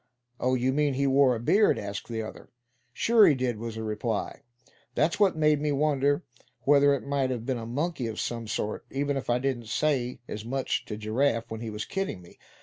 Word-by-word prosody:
"Oh! 130 Hz, +1 st, +2 dB
you 130 Hz, +1 st, +1 dB
mean 145 Hz, -1 st, +1 dB
he 140 Hz, +1 st, +1 dB
wore 135 Hz, -2 st, +4 dB
a -, -, -4 dB
beard?" 205 Hz, -, +3 dB
asked 100 Hz, 0 st, -5 dB
the 115 Hz, -1 st, -3 dB
other. 110 Hz, -, -10 dB, 0.4 s
"Sure 220 Hz, -, +5 dB
he 150 Hz, -, +5 dB
did," 125 Hz, -4 st, -2 dB
was 115 Hz, -1 st, -5 dB
the 110 Hz, -, -4 dB
reply. 110 Hz, 0 st, -3 dB, 0.5 s
"That's 160 Hz, +6 st, +1 dB
what 200 Hz, -4 st, +4 dB
made 150 Hz, -1 st, +3 dB
me 150 Hz, -1 st, 0 dB
wonder 145 Hz, +1 st, +1 dB, 0.4 s
whether 140 Hz, +2 st, +5 dB
it 135 Hz, -, -6 dB
might 140 Hz, -2 st, 0 dB
have 120 Hz, -3 st, -3 dB
been 130 Hz, -2 st, -1 dB
a 115 Hz, -, -6 dB
monkey 140 Hz, +1 st, -2 dB
of 110 Hz, -1 st, -5 dB
some 115 Hz, -2 st, -3 dB
sort, 105 Hz, 0 st, -3 dB
even 140 Hz, +1 st, -1 dB
if 135 Hz, -, -4 dB
I 120 Hz, -, +3 dB
didn't 125 Hz, -3 st, -2 dB
say 125 Hz, 0 st, 0 dB
as 105 Hz, -, -6 dB
much 130 Hz, +3 st, -2 dB
to 105 Hz, -, -5 dB
Giraffe 115 Hz, +2 st, 0 dB
when 110 Hz, 0 st, -5 dB
he 115 Hz, -, -4 dB
was 105 Hz, 0 st, -4 dB
kidding 195 Hz, -, -3 dB
me. 85 Hz, -1 st, -17 dB
130 Hz, 215 wpm, -27 LUFS, 115-145 Hz, 0.5 s, Sure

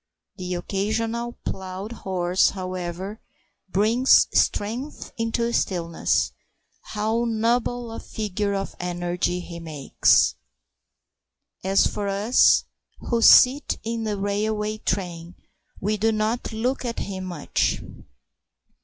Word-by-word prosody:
The 180 Hz, -1 st, -3 dB
occasional 225 Hz, +6 st, -2 dB
plough 190 Hz, +2 st, -5 dB
horse, 185 Hz, -5 st, +1 dB
however, 185 Hz, +2 st, -5 dB, 0.5 s
brings 225 Hz, +7 st, +4 dB
strength 240 Hz, +8 st, -1 dB
into 230 Hz, +1 st, -1 dB
the 235 Hz, 0 st, -1 dB
stillness. 170 Hz, -6 st, 0 dB, 0.5 s
How 220 Hz, +3 st, -1 dB
noble 235 Hz, +1 st, 0 dB
a 225 Hz, -, -6 dB
figure 205 Hz, -1 st, -3 dB
of 195 Hz, 0 st, -4 dB
energy 175 Hz, 0 st, -2 dB
he 170 Hz, -1 st, -8 dB
makes! 155 Hz, -5 st, +2 dB, 1.3 s
As 195 Hz, +1 st, +3 dB
for 205 Hz, -1 st, -2 dB
us 205 Hz, +5 st, +4 dB, 0.5 s
who 235 Hz, -1 st, +2 dB
sit 260 Hz, +5 st, +6 dB
in 230 Hz, 0 st, -3 dB
the 210 Hz, -1 st, -1 dB
railway 210 Hz, +2 st, -1 dB
train, 175 Hz, -3 st, -3 dB, 0.4 s
we 210 Hz, +2 st, 0 dB
do 225 Hz, +2 st, +2 dB
not 220 Hz, +3 st, -1 dB
look 245 Hz, +5 st, -1 dB
at 235 Hz, -2 st, -3 dB
him 190 Hz, -1 st, -4 dB
much. 175 Hz, -5 st, -1 dB
205 Hz, 110 wpm, -24 LUFS, 185-230 Hz, 1.3 s, sit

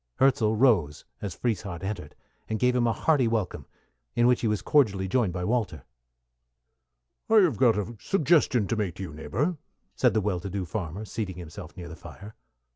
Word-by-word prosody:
Hirzel 115 Hz, -5 st, +3 dB
rose 105 Hz, -, +2 dB, 0.2 s
as 95 Hz, -4 st, -4 dB
Frieshardt 95 Hz, -6 st, -3 dB
entered, 100 Hz, +2 st, -5 dB, 0.3 s
and 110 Hz, -, -1 dB
gave 125 Hz, +2 st, +2 dB
him 120 Hz, -1 st, +2 dB
a -, -, +3 dB
hearty 140 Hz, 0 st, +2 dB
welcome, 110 Hz, -5 st, -2 dB, 0.5 s
in 120 Hz, -, +3 dB
which 125 Hz, 0 st, +4 dB
he 115 Hz, -, +1 dB
was 105 Hz, -3 st, -1 dB
cordially 100 Hz, -10 st, +3 dB
joined 110 Hz, -1 st, +1 dB
by 90 Hz, 0 st, -4 dB
Walter. 115 Hz, 0 st, -1 dB, 1.5 s
"I 225 Hz, -, +4 dB
have 160 Hz, -, +2 dB
got 115 Hz, -1 st, +4 dB
a 105 Hz, +3 st, -3 dB
suggestion 155 Hz, -, +2 dB
to 115 Hz, -, -1 dB
make 100 Hz, -6 st, -2 dB
to 95 Hz, -, -6 dB
you, 85 Hz, -, -7 dB
neighbor," 135 Hz, -, -2 dB, 0.4 s
said 125 Hz, -4 st, +3 dB
the 110 Hz, -, +3 dB
well 95 Hz, -3 st, -1 dB
to 100 Hz, -, -6 dB
do 95 Hz, -1 st, -3 dB
farmer, 90 Hz, +2 st, -4 dB
seating 100 Hz, -4 st, -4 dB
himself 85 Hz, -2 st, -9 dB
near 90 Hz, -2 st, -7 dB
the 85 Hz, -, -8 dB
fire. 100 Hz, +5 st, -11 dB
105 Hz, 190 wpm, -27 LUFS, 95-125 Hz, 1.5 s, which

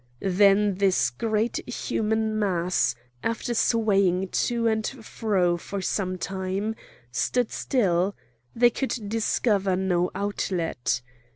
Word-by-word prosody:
Then 200 Hz, +1 st, +5 dB
this 195 Hz, -9 st, +3 dB
great 220 Hz, -, -1 dB
human 220 Hz, -2 st, -1 dB
mass, 180 Hz, -, +1 dB, 0.3 s
after 230 Hz, +1 st, -1 dB
swaying 195 Hz, -5 st, +2 dB
to 235 Hz, +4 st, 0 dB
and 220 Hz, -1 st, +1 dB
fro 210 Hz, -8 st, 0 dB
for 200 Hz, +3 st, -5 dB
some 185 Hz, 0 st, -1 dB
time, 190 Hz, +4 st, -3 dB, 0.4 s
stood 220 Hz, -, 0 dB
still; 195 Hz, -6 st, +1 dB, 0.4 s
they 240 Hz, +1 st, +5 dB
could 265 Hz, +1 st, -2 dB
discover 205 Hz, -3 st, +1 dB
no 180 Hz, -1 st, +1 dB
outlet. 170 Hz, -10 st, -1 dB
200 Hz, 105 wpm, -26 LUFS, 185-220 Hz, 0.4 s, Then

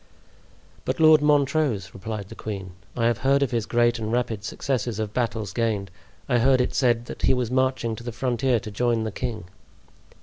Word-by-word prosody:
"But -, -, -2 dB
Lord 155 Hz, -1 st, +7 dB
Montrose," 140 Hz, -, +2 dB
replied 100 Hz, 0 st, -6 dB
the -, -, -8 dB
queen, 100 Hz, -4 st, -6 dB, 0.3 s
"I 115 Hz, -, +1 dB
have 115 Hz, 0 st, +2 dB
heard 135 Hz, +3 st, +3 dB
of 135 Hz, -, -1 dB
his 115 Hz, -3 st, -1 dB
great 120 Hz, 0 st, +2 dB
and 110 Hz, 0 st, -3 dB
rapid 115 Hz, -4 st, -1 dB
successes 120 Hz, -1 st, -2 dB
of 110 Hz, -1 st, -3 dB
battles 110 Hz, -6 st, -2 dB
gained. 105 Hz, -5 st, -1 dB, 0.4 s
I 125 Hz, -3 st, +2 dB
heard 130 Hz, +2 st, +4 dB
it 125 Hz, -, 0 dB
said 120 Hz, -3 st, +2 dB
that -, -, -8 dB
he 130 Hz, -, +3 dB
was 125 Hz, -2 st, -2 dB
marching 130 Hz, -3 st, +1 dB
to 120 Hz, -, -9 dB
the 120 Hz, -, -4 dB
frontier 125 Hz, +1 st, 0 dB
to 110 Hz, -3 st, -7 dB
join 115 Hz, +1 st, +1 dB
the 110 Hz, -, -3 dB
king." 110 Hz, 0 st, -4 dB
120 Hz, 195 wpm, -24 LUFS, 110-130 Hz, 0.4 s, Lord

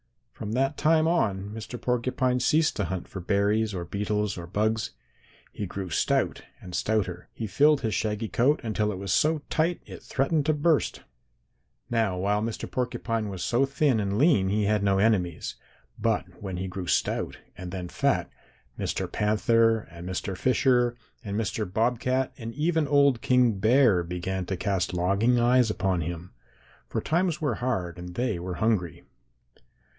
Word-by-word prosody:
From 105 Hz, 0 st, -5 dB
that 135 Hz, +4 st, +1 dB
time 155 Hz, +1 st, +3 dB
on 100 Hz, -, 0 dB
Mr. 110 Hz, +2 st, -7 dB
Porcupine 125 Hz, +1 st, 0 dB
ceased 155 Hz, +5 st, +2 dB
to 100 Hz, -, 0 dB
hunt 90 Hz, +1 st, -4 dB
for 95 Hz, -, -7 dB
berries 105 Hz, +3 st, +1 dB
or 85 Hz, -1 st, -4 dB
beetles 105 Hz, +2 st, -1 dB
or 85 Hz, -, -7 dB
bugs. 110 Hz, +3 st, 0 dB, 0.6 s
He 105 Hz, -, -5 dB
grew 95 Hz, -1 st, -6 dB
stout -, -, +1 dB, 0.2 s
and 90 Hz, -, -11 dB
stouter. 90 Hz, -5 st, -1 dB
He 115 Hz, -, -4 dB
filled 145 Hz, +8 st, +3 dB
his 110 Hz, -3 st, -1 dB
shaggy 105 Hz, 0 st, -1 dB
coat 130 Hz, +7 st, +2 dB
until 110 Hz, -2 st, 0 dB
it 95 Hz, -, -5 dB
was 100 Hz, +1 st, -2 dB
so 155 Hz, -1 st, +2 dB
tight 165 Hz, +2 st, +1 dB
it -, -, -10 dB
threatened 145 Hz, +2 st, 0 dB
to 155 Hz, -, +4 dB
burst. 150 Hz, +1 st, +1 dB, 0.9 s
"Now 110 Hz, -6 st, +1 dB
while 100 Hz, +3 st, +1 dB
Mr. 115 Hz, 0 st, -4 dB
Porcupine 115 Hz, -3 st, -2 dB
was 95 Hz, -2 st, -5 dB
so 130 Hz, +3 st, +2 dB
thin 135 Hz, -3 st, +2 dB
and 100 Hz, -1 st, -1 dB
lean 130 Hz, -, +4 dB
he 105 Hz, +2 st, +1 dB
had 105 Hz, 0 st, +2 dB
no 100 Hz, -1 st, +2 dB
enemies, 95 Hz, -5 st, 0 dB, 0.4 s
but -, -, +1 dB, 0.2 s
when 95 Hz, -3 st, -4 dB
he 95 Hz, +1 st, -3 dB
grew 90 Hz, -1 st, -6 dB
stout -, -, 0 dB, 0.2 s
and 90 Hz, -1 st, -7 dB
then 90 Hz, -2 st, -5 dB
fat, -, -, 0 dB, 0.5 s
Mr. -, -, -2 dB
Panther 115 Hz, +2 st, +3 dB
and 85 Hz, +1 st, -8 dB
Mr. 95 Hz, +1 st, -3 dB
Fisher 125 Hz, +1 st, +2 dB, 0.3 s
and 100 Hz, -1 st, -3 dB
Mr. 105 Hz, -2 st, -2 dB
Bobcat 125 Hz, +4 st, 0 dB
and 115 Hz, 0 st, -6 dB
even 160 Hz, 0 st, +1 dB
old 140 Hz, -4 st, +4 dB
King 125 Hz, -5 st, +3 dB
Bear 110 Hz, -3 st, +4 dB
began 90 Hz, +2 st, -3 dB
to 95 Hz, -, -2 dB
cast 95 Hz, -2 st, -1 dB
longing 100 Hz, +8 st, +2 dB
eyes 120 Hz, 0 st, +4 dB
upon 95 Hz, -4 st, 0 dB
him, 85 Hz, +2 st, -6 dB, 0.5 s
for -, -, -2 dB
times 170 Hz, +1 st, 0 dB
were 150 Hz, -7 st, 0 dB
hard 95 Hz, -9 st, -2 dB
and 90 Hz, 0 st, -8 dB
they 120 Hz, -6 st, -1 dB
were 90 Hz, +1 st, -4 dB
hungry. 95 Hz, -5 st, 0 dB
110 Hz, 165 wpm, -27 LUFS, 95-125 Hz, 0.9 s, to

